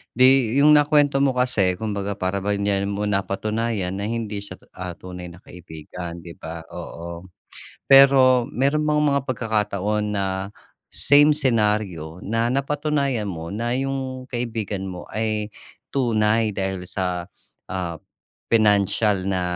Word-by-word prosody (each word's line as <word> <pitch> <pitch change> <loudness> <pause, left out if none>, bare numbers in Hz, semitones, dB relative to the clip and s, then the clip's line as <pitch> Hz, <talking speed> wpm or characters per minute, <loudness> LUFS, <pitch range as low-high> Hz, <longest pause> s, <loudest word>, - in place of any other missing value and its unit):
'Di 130 -1 +4
'yong 145 +2 +6
nakuwento 145 -1 +4
mo 135 -2 +2
kasi 115 -8 +2
kumbaga 100 0 -3
para 95 +2 -2
bang 100 +1 -1
diyan 100 -1 0
mo 100 +1 -3
napatunayan 105 0 -1
na 100 - -2
hindi 110 -2 -3
siya, 100 -2 -9 0.2
ah, 90 -1 -7
tunay 90 0 -9
na 90 +1 -14
kaibigan 85 +1 -9
'di 85 - -9
ba, 80 0 -7
oo. 85 +1 -8 0.6
Pero 135 -2 +7
meron 145 +2 0
bang 150 0 +2
mga 140 0 +2
pagkakataon 105 -3 -1
na 100 -1 0 0.7
same 145 +1 +5
senaryo 105 - 0
na 115 +3 0
napatunayan 140 -2 -1
mo 85 -3 -5
na 120 +4 -2
'yong 130 -1 -3
kaibigan 110 -5 -3
mo 90 -1 -7
ay 110 -1 -2 0.4
tunay 110 -4 +1
dahil 95 -2 -3
sa, 90 -1 -3 0.4
ah, 90 -3 -4 0.5
pinansiyal 105 -2 +2
na 95 -2 0
105 Hz, 130 wpm, -23 LUFS, 95-130 Hz, 0.7 s, Pero